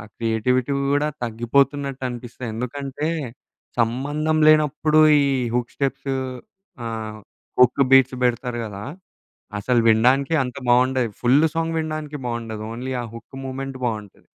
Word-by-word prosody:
Creativity 120 +4 0 0.2
కూడా 145 +1 +2 0.2
తగ్గిపోతున్నట్టు 135 +4 0
అనిపిస్తుంది. 120 0 -7
ఎందుకంటే, 140 +5 -3 0.7
సంబంధం 145 +7 0
లేనప్పుడు 155 0 +4 0.2
ఈ - - +3 0.3
హుక్ 125 -1 -2
స్టెప్స్ 135 0 -2 0.7
ఆహ్, 110 -1 -5 0.4
హుక్ 125 +2 +5
బీట్స్ 130 -1 +6
పెడతారు 120 0 -1
గదా! 100 -1 -7 0.8
అసల 120 +4 +1
వినడానికి 130 +7 +3
అంత 125 +1 -5
బావుండదు. 125 -1 +3
ఫుల్ 135 +6 +4
సాంగ్ 165 0 -1
వినడానికి 155 -2 -4
బావుండదు. 115 -2 -4
ఓన్లీ 130 +3 -5
ఆ - - -5
హుక్ 115 +3 -11
మూవ్‌మెంట్ 135 0 -5
బావుంటది. 105 -4 -4
130 Hz, 115 wpm, -22 LUFS, 120-140 Hz, 0.8 s, బీట్స్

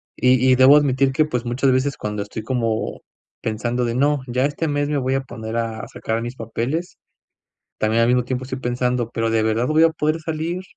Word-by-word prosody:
Y 130 0 +4
y 130 - +6
debo 130 +3 +7
admitir 135 -2 +2
que, 155 +3 +2
pues, 125 -5 -3
muchas 125 +3 +1
veces, 130 +2 +1
cuando 105 -1 -4
estoy 110 - -7
como 115 -1 -2 0.4
pensando 120 +3 -1
de: 115 - -1
"No, 145 +2 +2
ya 125 +2 +1
este 150 +3 -2
mes 145 0 0
me 150 - 0
voy 130 -1 0
a 135 - +1
poner 115 -3 -6
a 115 -1 -3
sacar 115 +1 -3
mis 120 +2 -5
papeles", 125 +9 -3 0.8
también 110 +2 +2
al 115 - +3
mismo 125 0 +3
tiempo 130 0 -3
estoy 130 0 -5
pensando: 125 -1 -1
"Pero 115 -1 -1
¿de 110 -1 +2
verdad 110 +2 +1
voy 155 +1 +4
a 165 - +5
poder 155 0 -1
salir? 160 +3 -3
125 Hz, 210 wpm, -21 LUFS, 115-145 Hz, 0.8 s, debo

